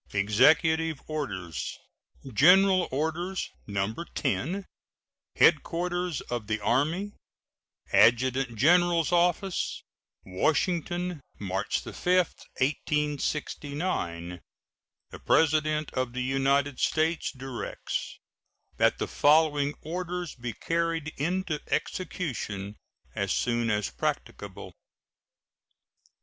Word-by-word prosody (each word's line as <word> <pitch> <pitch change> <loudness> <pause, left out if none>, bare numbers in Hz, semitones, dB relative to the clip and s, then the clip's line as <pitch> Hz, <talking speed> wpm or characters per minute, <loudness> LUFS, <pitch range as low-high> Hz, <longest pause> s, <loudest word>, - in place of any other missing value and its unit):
EXECUTIVE 155 +10 +3
ORDERS. 100 - -4 0.6
GENERAL 185 - +6
ORDERS, 160 +7 -2 0.2
No. 100 +1 -1 0.2
10. 170 +8 -1 0.7
HEADQUARTERS 175 -1 +2
OF 120 -4 -5
THE 110 0 -1
ARMY, 160 - 0 0.8
ADJUTANT 125 +1 +4
GENERAL'S 170 +4 +4
OFFICE, 175 +2 +1 0.4
Washington, 175 - 0 0.2
March 95 -1 -2
5, - - -9 0.2
1869. 145 - -2 0.7
The - - -9
President 155 -1 +2
of 130 -2 -2
the 125 0 -2
United 135 +1 +1
States 160 +1 +1
directs 130 -2 -5 0.6
that - - +3
the - - -2
following 145 -1 +3
orders 175 0 -4
be 120 -2 -6
carried 165 -2 -1
into 165 +1 -1
execution 125 - -3 0.4
as - - -1
soon 120 -1 0
as 105 -1 0
practicable: - - -4
1. - - -12
150 Hz, 85 wpm, -28 LUFS, 125-170 Hz, 0.8 s, GENERAL